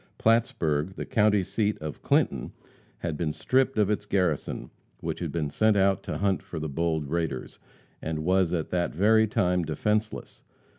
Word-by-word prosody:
Plattsburg, 95 -8 +1
the - - -5
county 105 -2 +3
seat 105 +2 -1
of 75 -1 -7
Clinton, - - +1 0.5
had 85 -3 -2
been 75 0 -1
stripped 130 - +1
of 105 -1 +3
its 105 0 -2
garrison, 90 -8 -1 0.3
which - - -4
had - - -3
been 75 -4 -2
sent 110 +5 +3
out 95 0 +3
to - - -4
hunt 100 -2 +1
for 85 - -8
the 80 - -3
bold 80 +1 -1
raiders, 80 -4 -3 0.4
and 80 -1 -3
was 95 -1 +3
at 85 -3 -2
that 85 -3 -1
very 110 +5 +4
time 90 -3 +1
defenseless. 105 +8 -2
90 Hz, 165 wpm, -27 LUFS, 80-105 Hz, 0.5 s, very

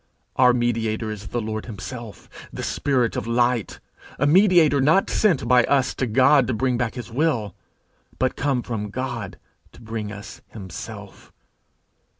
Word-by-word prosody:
Our 125 -1 +5
mediator 115 -2 -1
is 105 -1 -8
the 120 - -2
Lord 110 0 -4
himself, 115 0 -8 0.2
the - - -6
spirit 120 - 0
of - - -3
light, 120 -1 0 0.4
a 145 - +1
mediator 170 -4 +5
not 160 +8 +3
sent 190 -10 +2
by 125 -1 +5
us 135 -2 +1
to 130 - -2
God 130 +4 +4
to 130 - -1
bring 130 +2 0
back 120 -2 -2
his 120 -2 -7
will, 120 - 0 0.6
but 130 0 0
come 135 -4 -1
from 105 -3 -4
God 115 -3 -5 0.4
to - - -15
bring 110 -2 -5
us 105 +2 -10
himself. 95 -6 -10
120 Hz, 155 wpm, -23 LUFS, 110-135 Hz, 0.6 s, Our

